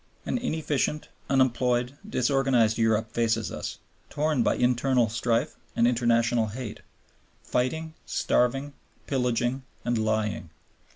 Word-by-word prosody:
An -, -, -1 dB
inefficient, 155 Hz, -, -1 dB, 0.2 s
unemployed, 125 Hz, -1 st, +2 dB
disorganized 125 Hz, -, +2 dB
Europe 110 Hz, -1 st, +2 dB
faces 115 Hz, -1 st, 0 dB
us, -, -, -5 dB, 0.3 s
torn 150 Hz, -3 st, +1 dB
by -, -, +2 dB
internal 125 Hz, -1 st, +2 dB
strife 115 Hz, +1 st, 0 dB, 0.2 s
and 115 Hz, -, +4 dB
international 120 Hz, -1 st, +2 dB
hate, 115 Hz, +1 st, -6 dB, 0.6 s
fighting, 160 Hz, +6 st, -1 dB
starving, 135 Hz, +4 st, +1 dB, 0.3 s
pillaging, 125 Hz, -1 st, 0 dB, 0.2 s
and 120 Hz, -1 st, +1 dB
lying. 110 Hz, -5 st, -1 dB
125 Hz, 105 wpm, -27 LUFS, 115-135 Hz, 0.6 s, and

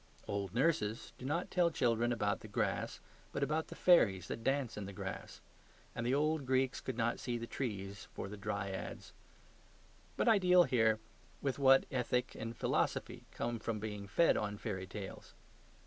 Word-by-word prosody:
Old 100 Hz, -2 st, -2 dB
nurses 120 Hz, -6 st, +1 dB
do 125 Hz, -, -7 dB
not 170 Hz, +5 st, -1 dB
tell 175 Hz, -2 st, +4 dB
children 120 Hz, -5 st, +1 dB
about 105 Hz, -2 st, 0 dB
the -, -, -10 dB
grass, 105 Hz, -, -1 dB, 0.3 s
but -, -, -1 dB
about 155 Hz, +1 st, 0 dB
the -, -, -9 dB
fairies 100 Hz, -, +4 dB
that 115 Hz, -, -4 dB
dance 135 Hz, -3 st, 0 dB
on 105 Hz, -, -5 dB
the 100 Hz, -, -7 dB
grass; -, -, -6 dB, 0.5 s
and 120 Hz, -, -3 dB
the 120 Hz, +2 st, +1 dB
old 155 Hz, +1 st, +1 dB
Greeks 130 Hz, +1 st, +1 dB
could 130 Hz, -3 st, -4 dB
not 120 Hz, 0 st, +1 dB
see 120 Hz, -1 st, -2 dB
the 115 Hz, -, -4 dB
trees 100 Hz, -6 st, -4 dB
for -, -, -5 dB
the 105 Hz, -, -7 dB
dryads. 100 Hz, -1 st, -4 dB, 1.0 s
But -, -, +1 dB
I 220 Hz, -3 st, +6 dB
deal 180 Hz, -1 st, +6 dB
here 110 Hz, -7 st, +3 dB, 0.4 s
with 135 Hz, -1 st, -2 dB
what 135 Hz, -1 st, +6 dB
ethic 125 Hz, -1 st, 0 dB
and 115 Hz, 0 st, -6 dB
philosophy -, -, -1 dB
come 120 Hz, 0 st, -3 dB
from 110 Hz, 0 st, -2 dB
being 105 Hz, -1 st, -5 dB
fed 165 Hz, +12 st, +4 dB
on 105 Hz, -1 st, -2 dB
fairy 95 Hz, -3 st, -4 dB
tales. 95 Hz, 0 st, -8 dB
115 Hz, 175 wpm, -35 LUFS, 105-135 Hz, 1.0 s, I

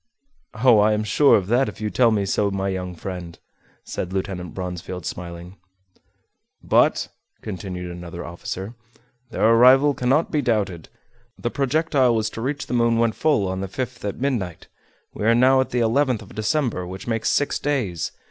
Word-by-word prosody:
"Oh! 120 Hz, -1 st, +5 dB
I 105 Hz, +1 st, +4 dB
am 105 Hz, 0 st, 0 dB
sure 135 Hz, +8 st, +4 dB
of 100 Hz, -, -2 dB
that, 120 Hz, 0 st, +3 dB
if -, -, -11 dB
you 105 Hz, -1 st, -3 dB
tell 125 Hz, -2 st, +4 dB
me 105 Hz, -3 st, +1 dB
so, 100 Hz, +1 st, +1 dB
my 95 Hz, 0 st, -2 dB
young 90 Hz, -1 st, -4 dB
friend," 85 Hz, -1 st, -7 dB, 0.5 s
said 90 Hz, -, -5 dB
Lieutenant 95 Hz, -3 st, -4 dB
Bronsfield, 90 Hz, 0 st, -5 dB
smiling. 85 Hz, +2 st, -7 dB, 1.1 s
"But," -, -, +2 dB, 0.3 s
continued 90 Hz, -3 st, -6 dB
another 85 Hz, 0 st, -8 dB
officer, 95 Hz, +4 st, -6 dB, 0.6 s
"their 110 Hz, -, +1 dB
arrival 130 Hz, +5 st, +6 dB
cannot 135 Hz, +5 st, +1 dB
be 150 Hz, -, +1 dB
doubted. 105 Hz, -, -1 dB, 0.5 s
The 120 Hz, -, -3 dB
projectile 140 Hz, -3 st, +2 dB
was 110 Hz, -1 st, -1 dB
to 115 Hz, -, -7 dB
reach 140 Hz, +3 st, -2 dB
the -, -, -6 dB
moon 115 Hz, -1 st, +2 dB
when 115 Hz, 0 st, +3 dB
full 140 Hz, -5 st, +1 dB
on 95 Hz, 0 st, -3 dB
the 95 Hz, -, -3 dB
5th 125 Hz, +6 st, -5 dB
at 100 Hz, +1 st, -4 dB
midnight. 120 Hz, -, -2 dB, 0.5 s
We -, -, -6 dB
are 115 Hz, +1 st, +5 dB
now 130 Hz, +2 st, +5 dB
at 130 Hz, -, -3 dB
the 125 Hz, -, 0 dB
11th 120 Hz, 0 st, +1 dB
of 100 Hz, -, -15 dB
December, 110 Hz, -, -1 dB
which 95 Hz, +2 st, -8 dB
makes 115 Hz, -2 st, -1 dB
six 145 Hz, -, +1 dB
days. 120 Hz, -, -2 dB
110 Hz, 175 wpm, -22 LUFS, 95-125 Hz, 1.1 s, arrival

